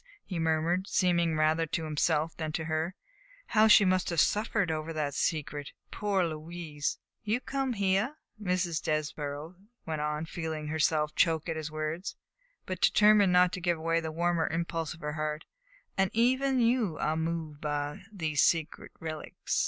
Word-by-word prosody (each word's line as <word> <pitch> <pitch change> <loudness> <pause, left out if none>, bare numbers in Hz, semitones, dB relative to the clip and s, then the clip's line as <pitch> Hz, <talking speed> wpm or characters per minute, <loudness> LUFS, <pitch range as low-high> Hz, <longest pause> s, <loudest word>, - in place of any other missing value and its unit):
he 180 -4 -4
murmured, 165 +4 +1
seemingly 170 -3 +2
rather 155 +1 +2
to 160 +1 -2
himself 155 +1 0
than 155 -1 -3
to 160 +1 -3
her; 160 +3 -1 0.5
"how 220 -1 +4
she 210 -1 +8
must 185 0 +2
have 170 -2 0
suffered 200 -2 +2
over 155 +1 -3
that 150 -3 -2
secret. 145 -2 -2 0.2
Poor 200 -3 0
Louise!" 155 -2 -4 0.3
"You 215 +3 0
come 270 -1 -2
here," 200 +6 +1 0.3
Mrs. 180 -4 0
Desborough 150 +2 -3 0.3
went 155 -2 -3
on, 150 +1 -1
feeling 160 -2 -4
herself 155 -1 +1
choke 165 -2 +2
at 165 - -2
his 155 -1 -4
words, 155 +4 -4 0.5
but 185 -2 -5
determined 210 -2 +5
not 180 0 +5
to 185 - -4
give 170 -2 +1
way 165 +1 +1
to - - +1
the 160 -1 -4
warmer 170 0 +1
impulse 165 -1 -2
of 165 - -17
her 150 0 -3
heart, 155 0 -3 0.5
"and 195 -1 +3
even 260 +3 +3
you 230 - +2
are 155 +2 0
moved 160 -2 -3
by 145 -1 -2
these 160 -7 0
sacred 165 -2 +1
relics. 155 -1 -3
165 Hz, 165 wpm, -30 LUFS, 155-185 Hz, 0.5 s, she